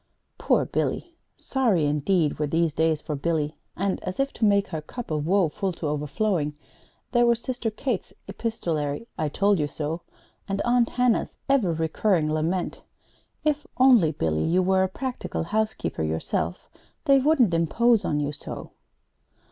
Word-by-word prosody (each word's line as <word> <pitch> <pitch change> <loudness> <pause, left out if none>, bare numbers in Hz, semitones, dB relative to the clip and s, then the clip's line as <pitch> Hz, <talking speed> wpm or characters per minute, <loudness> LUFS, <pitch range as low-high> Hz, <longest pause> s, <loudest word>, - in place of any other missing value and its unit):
Poor - - +2
Billy! 340 - -2 0.2
Sorry 225 - +1
indeed 150 +2 +1
were 150 - +1
these 165 +1 +1
days 160 -1 +1
for 155 - -4
Billy; 155 0 -1 0.2
and, 195 +1 -1
as 185 +4 -5
if 275 0 0
to 225 - 0
make 200 -1 +3
her 160 -3 -4
cup 230 +7 -8
of 150 0 -1
woe 190 -1 +4
full 190 +5 -2
to 165 - -6
overflowing, 150 +1 -1 0.5
there 240 -1 +4
were 235 0 +5
Sister 240 0 -3
Kate's 220 -1 -3 0.2
epistolary 175 -7 -2
"I 155 - -1
told 200 +4 +2
you 150 - +1
so," 155 +3 -4 0.5
and 195 0 -1
Aunt 240 -1 +3
Hannah's 250 -2 +1
ever 260 -10 +3
recurring 160 0 +1
lament: 170 +3 -1 0.6
"If 295 -1 0
only, 245 -11 +6
Billy, 80 - -1
you 180 +3 +2
were 190 +1 +3
a 190 - +2
practical 255 -3 -4
housekeeper 215 - -2
yourself, 80 +1 -2 0.4
they 275 -1 +6
wouldn't 265 - +3
impose 220 +8 +3
on 150 - 0
you 145 0 -1
so!" 145 - -7
185 Hz, 155 wpm, -25 LUFS, 155-230 Hz, 0.6 s, only